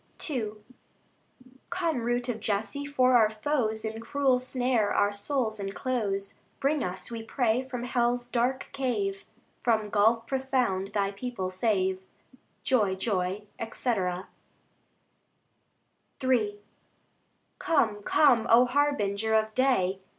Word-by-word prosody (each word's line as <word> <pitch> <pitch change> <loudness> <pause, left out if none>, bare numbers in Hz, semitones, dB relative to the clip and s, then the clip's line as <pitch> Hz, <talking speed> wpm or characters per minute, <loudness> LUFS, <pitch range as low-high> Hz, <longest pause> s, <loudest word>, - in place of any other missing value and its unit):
II 235 -9 -2 1.2
Come, 345 -4 -1
Root 240 +1 -1
of 235 -3 -2
Jesse! 220 +8 -2
for 255 -3 +3
our 220 -3 +6
foes 220 -1 -1
In 220 0 -4
cruel 265 +1 +2
snare 250 -4 0
our 205 0 +2
souls 220 0 -1
enclose; 200 -1 -2 0.2
Bring 285 +1 +1
us, 180 +4 -5
we 230 -1 -4
pray, 235 +1 +1
from 250 -2 -6
hell's 245 0 0
dark 250 +2 -1
cave, 210 -8 -2 0.3
From 220 -3 +1
gulf 225 +2 +3
profound 250 -8 -1
Thy 200 -1 +1
people 200 -3 -4
save. 190 -2 0 0.6
Joy, 210 -7 +2
joy, 190 0 -1 0.3
&c. 255 - -3 2.4
III 215 -5 +1 1.0
Come, 220 -10 +1
come, 240 -1 +4
O 240 +2 +7
Harbinger 225 -6 +1
of 220 0 +1
day! 205 -8 +2
230 Hz, 115 wpm, -28 LUFS, 205-255 Hz, 2.4 s, O